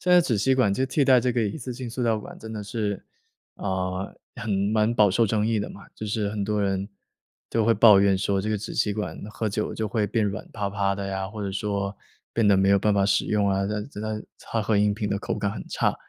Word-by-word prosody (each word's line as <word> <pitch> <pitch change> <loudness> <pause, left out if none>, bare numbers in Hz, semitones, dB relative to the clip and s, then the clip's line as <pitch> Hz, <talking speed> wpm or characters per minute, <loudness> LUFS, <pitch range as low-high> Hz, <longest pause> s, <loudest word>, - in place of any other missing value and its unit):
现 180 - 0
在 180 -1 +7
纸 120 -9 0
吸 130 +7 +3
管 125 -6 +3
就 130 +6 0
替 140 +1 +1
代 130 -2 +6
这 125 - +1
个 120 -1 +1
一 105 +8 -2
次 125 -2 -6
性 125 -1 -6
塑 125 +2 -4
料 115 -2 +2
管 - - -10
真 110 - -9
的 110 -2 -5
是， 105 -1 -3 0.5
啊， 95 0 -2 0.3
很 115 -3 -4 0.2
蛮 110 +1 +2
饱 105 -3 +5
受 115 +4 +3
争 105 0 +1
议 115 -1 +1
的 100 - -4
嘛， 100 - -11
就 110 - -6
是 105 -1 -1
很 105 -1 -3
多 105 0 0
人 95 0 -1 0.6
都 115 - +1
会 115 +1 +4
抱 105 -4 +7
怨 100 -1 +4
说 100 0 0
这 105 - -3
个 110 - +1
纸 105 - -6
吸 105 - +1
管 105 0 -4
喝 110 - -3
酒 105 +2 -2
就 110 - -2
会 105 -1 0
变 110 +1 0
软 100 +1 -3
趴 100 -2 -3
趴 100 0 0
的 100 0 -4
呀， 95 0 -3
或 105 +1 -6
者 100 -1 -3
说 100 0 -2 0.4
变 115 -3 +2
得 100 - +6
没 95 +1 +3
有 100 - +5
办 105 +1 +2
法 100 -1 +3
使 100 0 +2
用 105 -1 +1
啊， 95 0 +1
那 105 - -2 0.3
那 110 0 -3 0.2
它 115 -2 -3
喝 105 0 +2
饮 105 0 +3
品 105 -1 -3
的 100 - 0
口 - - -3
感 100 - -1
很 105 - -6
差。 - - +1
105 Hz, 285 characters per minute, -25 LUFS, 100-110 Hz, 0.6 s, 在